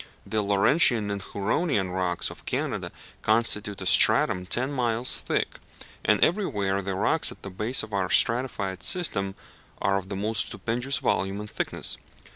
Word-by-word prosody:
The 110 - -1
Laurentian 105 +2 +3
and 100 -1 -3
Huronian 100 - -1
rocks 90 -1 -2
of - - -14
Canada - - -2 0.3
constitute 105 -3 +1
a - - -5
stratum 90 0 +4
ten 130 +7 0
miles 120 -1 +1
thick; - - -2 0.4
and 105 - +3
everywhere 100 - 0
the 95 0 -3
rocks 150 +11 +1
at - - -14
the 100 - -7
base 110 +7 0
of 105 - -10
our 95 -2 -1
stratified 110 -7 +2
system 100 - +3 0.4
are 100 0 +1
of 95 0 -12
the 100 - -4
most 105 +2 -1
stupendous 125 +4 -2
volume 95 +1 -1
and 105 0 -8
thickness. - - -2
105 Hz, 155 wpm, -26 LUFS, 95-120 Hz, 0.4 s, stratum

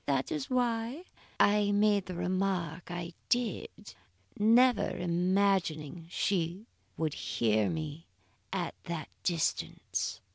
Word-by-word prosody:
"That 135 -2 +1
is 150 -3 -2
why 245 +4 0 0.4
I 205 0 +4
made 205 -1 +3
the 180 - -5
remark 180 -2 -1
I 175 0 -5 0.2
did, 240 -5 -2 0.5
never 240 +4 +5
imagining 175 -3 +1
she 180 +1 -1 0.3
would 155 -2 0
hear 110 -3 +1
me 155 0 -4 0.4
at - - -2
that 165 -3 -4
distance. 170 -3 -1
180 Hz, 105 wpm, -31 LUFS, 165-205 Hz, 0.5 s, never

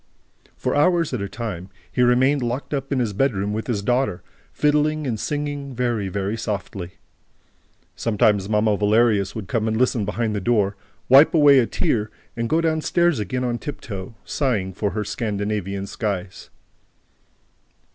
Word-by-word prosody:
For - - -1
hours 165 +1 +2
at 120 - -2
a 100 - -3
time, 100 -6 -5 0.2
he 125 - 0
remained 130 +3 +4
locked 120 +5 -3
up 135 -1 -3
in 140 - +1
his 115 -5 0
bedroom 105 -3 0
with 110 +1 -3
his 105 -5 -1
daughter, 120 -5 0 0.3
fiddling 150 +1 +1
and 115 -5 -2
singing, 145 -1 -3
very, 115 -5 -1
very 100 +3 -2
softly. 100 -4 -5 1.0
Sometimes 105 -3 +1
Mamma 105 0 +2
Valerius 105 -1 +2
would 110 -5 -5
come 110 +4 0
and 110 0 0
listen 125 -2 +2
behind 105 +2 -1
the 100 - -2
door, 105 -2 +1 0.3
wipe 140 +6 +7
away 145 -3 +7
a 120 - +2
tear 110 -2 0 0.3
and 115 0 -2
go 160 +1 +2
down 160 -1 +1
stairs 175 -4 +2
again 115 +5 -2
on 120 -1 -1
tiptoe, 105 -7 -7
sighing 110 -10 -1
for 100 +3 -1
her 105 - -1
Scandinavian 100 -3 -3
skies. 100 -3 -4
115 Hz, 155 wpm, -22 LUFS, 100-135 Hz, 1.0 s, wipe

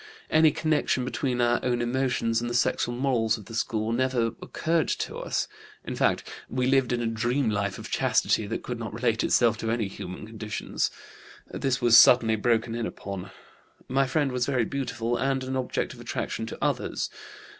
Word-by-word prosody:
Any 155 0 +6
connection 155 -4 0
between 125 -1 -1
our 120 0 +3
own 125 -1 +1
emotions 120 -2 0
and 120 - -2
the 120 - -3
sexual 120 0 +1
morals 120 -4 +1
of 105 - -12
the 115 - -11
school 110 -1 -1
never 120 -1 +1
occurred 165 0 0
to - - -2
us. - - -1 0.4
In - - -4
fact, - - +1 0.2
we 125 0 0
lived 135 -1 +3
a 120 -1 0
dream 120 +2 0
life 100 -2 -1
of - - -9
chastity 105 - +2
that - - -4
could 125 -1 -5
not 115 -2 -5
relate 115 -1 +1
itself 115 -2 +3
to 115 - -2
any 115 -2 0
human 95 +1 -7
conditions. 110 -1 -3 0.6
This 130 -2 -1
was 120 -1 +8
suddenly 115 -3 +6
broken 115 +1 +1
in 115 -1 -2
upon. 100 -2 -7 0.6
My 135 +1 +2
friend 140 0 +1
was 125 -1 0
very 130 -5 +1
beautiful 120 -3 -2
and 135 -1 0
an 130 0 -3
object 130 -1 -2
of - - -14
attraction 110 +1 -3
to - - -7
others. - - -1
120 Hz, 180 wpm, -27 LUFS, 115-130 Hz, 0.6 s, was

